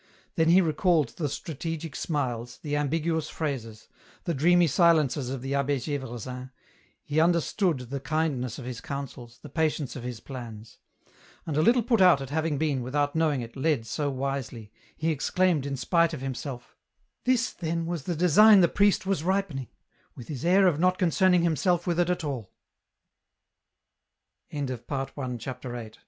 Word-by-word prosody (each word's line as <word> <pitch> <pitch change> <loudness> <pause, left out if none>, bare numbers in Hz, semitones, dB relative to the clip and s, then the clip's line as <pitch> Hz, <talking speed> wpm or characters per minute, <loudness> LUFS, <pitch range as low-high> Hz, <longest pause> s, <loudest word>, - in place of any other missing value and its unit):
Then 160 0 +2
he 180 +3 +7
recalled 160 - +2
the 150 +1 -3
strategic 160 +1 -5
smiles, 120 -6 -3
the 145 -2 -2
ambiguous 155 +2 -1
phrases, 120 -8 -5 0.4
the 170 - -1
dreamy 175 +5 +4
silences 150 -5 +3
of 130 -1 -5
the 135 - -4
Ahh6 140 +1 0
Gdvresin, 125 0 -7 0.5
he 150 +2 0
understood 170 +1 +2
the 140 - -2
kindness 140 -5 -1
of 130 - -8
his 125 -2 -6
counsels, 125 -4 -7
the - - -8
patience 155 -2 -1
of 130 - -6
his 120 -1 -6
plans; 115 -4 -9 0.7
and 155 - -3
a 155 - +3
little 235 +7 +4
put 230 -3 +2
out 180 -6 +7
at 135 0 -7
having 155 -1 0
been, 145 -3 0
without 145 +4 -1
knowing 155 -5 +1
it, 115 -1 -9
led 135 -4 0
so 145 +5 -2
wisely, 130 -5 -4 0.3
he 160 +1 0
exclaimed 160 0 +1
in 140 -1 -3
spite 170 +4 +2
of 135 - -9
himself, 130 -1 -6 0.2
" - - -47
This, 250 -2 +2
then, 165 0 -2
was 170 -4 -4
the 175 - -1
design 190 +5 +7
the 170 - +6
priest 205 0 +2
was 195 -5 0
ripening, 180 -8 -1 0.5
with 120 - -11
his 145 -2 -5
air 190 +3 +5
of 165 -5 +3
not 185 +1 +3
concerning 180 0 +3
himself 175 +1 +1
with 175 -1 0
it 175 0 +2
at 180 -1 -1
alL" 130 -9 -4 2.0
CHAPT 130 -2 -4
150 Hz, 160 wpm, -27 LUFS, 130-170 Hz, 2.0 s, he